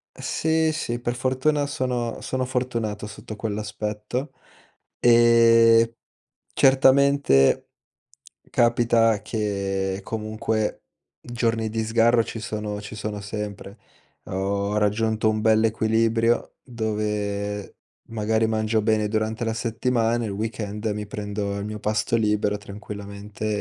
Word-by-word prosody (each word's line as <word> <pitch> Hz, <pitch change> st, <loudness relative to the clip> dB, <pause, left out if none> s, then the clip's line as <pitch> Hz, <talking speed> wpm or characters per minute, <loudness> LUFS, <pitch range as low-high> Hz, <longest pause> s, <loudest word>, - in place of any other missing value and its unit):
Sì, 160 Hz, 0 st, 0 dB
sì, 120 Hz, -6 st, -3 dB
per 120 Hz, 0 st, -2 dB
fortuna 130 Hz, +4 st, +1 dB
sono 125 Hz, -5 st, -2 dB
sono 130 Hz, 0 st, -2 dB
fortunato 115 Hz, -5 st, -2 dB
sotto 110 Hz, +1 st, -9 dB
quell'aspetto. 105 Hz, +4 st, -4 dB, 0.7 s
Ehm, 115 Hz, -1 st, +6 dB, 0.6 s
certamente 135 Hz, -, +4 dB, 0.8 s
capita 115 Hz, -2 st, +3 dB
che 100 Hz, -3 st, -2 dB
comunque 110 Hz, 0 st, -2 dB, 0.4 s
giorni 115 Hz, -2 st, -1 dB
di 110 Hz, 0 st, -2 dB
sgarro 115 Hz, +1 st, +3 dB
ci 115 Hz, -, -6 dB
sono 105 Hz, -2 st, -4 dB
ci 105 Hz, +1 st, -9 dB
sono 105 Hz, -1 st, -4 dB
sempre. 105 Hz, 0 st, -6 dB, 0.5 s
Ho 100 Hz, +2 st, -2 dB
raggiunto 110 Hz, +1 st, +1 dB
un 110 Hz, 0 st, -1 dB
bell'equilibrio 110 Hz, +1 st, +2 dB
dove 105 Hz, -3 st, -3 dB, 0.3 s
magari 110 Hz, 0 st, +1 dB
mangio 110 Hz, 0 st, 0 dB
bene 110 Hz, -1 st, +2 dB
durante 110 Hz, +1 st, -1 dB
la 115 Hz, -1 st, -1 dB
settimana, 115 Hz, +1 st, 0 dB
il 105 Hz, -, -3 dB
weekend 105 Hz, 0 st, -4 dB
mi 105 Hz, -1 st, -2 dB
prendo 105 Hz, 0 st, -4 dB
il 100 Hz, -, -4 dB
mio 105 Hz, 0 st, -5 dB
pasto 105 Hz, +1 st, 0 dB
libero 105 Hz, -2 st, +1 dB
tranquillamente 100 Hz, 0 st, -8 dB
110 Hz, 105 wpm, -24 LUFS, 105-115 Hz, 0.8 s, Ehm